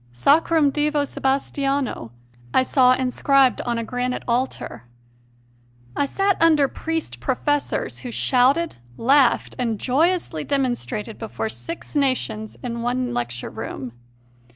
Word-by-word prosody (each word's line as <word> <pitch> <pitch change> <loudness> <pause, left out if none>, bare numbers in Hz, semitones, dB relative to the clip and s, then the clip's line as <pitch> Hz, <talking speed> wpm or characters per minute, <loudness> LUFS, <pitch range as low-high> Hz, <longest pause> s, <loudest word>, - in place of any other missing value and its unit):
Sacrum 295 - +3
Divo 295 0 +1
Sebastiano, 275 - -1 0.4
I 260 - +5
saw 255 -1 +4
inscribed 260 +1 +2
on 240 -1 0
a 230 - -2
granite 250 +2 -3
altar. 235 - -2 1.1
I 285 - +1
sat 390 +4 0
under 310 -4 +5
priest 325 +3 -4
professors 290 +2 -1
who 250 - -7
shouted, 265 +7 +2 0.2
laughed, 265 +1 +3
and 230 -4 -1
joyously 310 - +1
demonstrated 240 - -2
before 220 0 -4
six 335 +6 -7
nations 245 -6 -1
in 235 -2 -4
one 245 +1 -1
lecture 120 0 -3
room. 130 -2 -6
260 Hz, 115 wpm, -22 LUFS, 235-290 Hz, 1.1 s, I